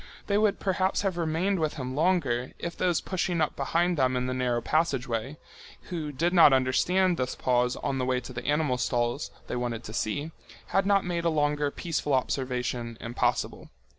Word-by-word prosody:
They 205 0 +2
would 210 -2 +2
perhaps 190 0 0
have 195 -3 0
remained 170 +3 0
with 155 -1 -1
him 130 -3 -4
longer, 145 -6 +1
if 170 - -5
those 175 -3 +1
pushing 180 -2 -1
up 155 - 0
behind 170 +5 +1
them 130 -1 +2
in 125 - -1
the 130 - -1
narrow 125 -2 0
passage 140 0 0
way, 120 +5 -3 0.5
who 160 -4 -3
did 170 +6 0
not 165 -6 +8
understand 175 +8 +2
this 130 0 -2
pause 125 -1 +1
on 135 - -2
the 130 - 0
way 130 0 +1
to 125 +1 -9
the 120 0 -6
animal 145 -4 +1
stalls 120 +3 0 0.2
they - - -4
wanted 120 -2 -3
to 110 - -8
see, 145 +8 -2 0.4
had 195 0 +2
not 200 -1 +3
made 170 -1 -2
a - - +4
longer 150 -2 +1
peaceful 150 -2 -1
observation 125 -3 -2
impossible. 115 +1 -1
145 Hz, 190 wpm, -28 LUFS, 125-170 Hz, 0.5 s, not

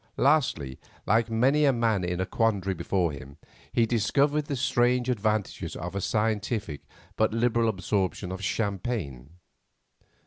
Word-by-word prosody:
Lastly, 125 - +1 0.3
like 115 +2 +2
many 130 +7 +3
a 140 - +5
man 115 -6 +1
in 90 0 -2
a 95 - 0
quandary 100 -4 0
before 85 0 0
him, 70 0 -10 0.3
he 115 - +3
discovered 140 +7 +1
the 145 - -3
strange 125 0 +1
advantages 110 -3 -2
of 90 +2 -5
a 100 - -2
scientific 105 - -1 0.3
but 110 0 +1
liberal 115 -1 +2
absorption 95 -1 -2
of 95 +1 -6
champagne. 95 - -3
110 Hz, 135 wpm, -27 LUFS, 95-120 Hz, 0.3 s, a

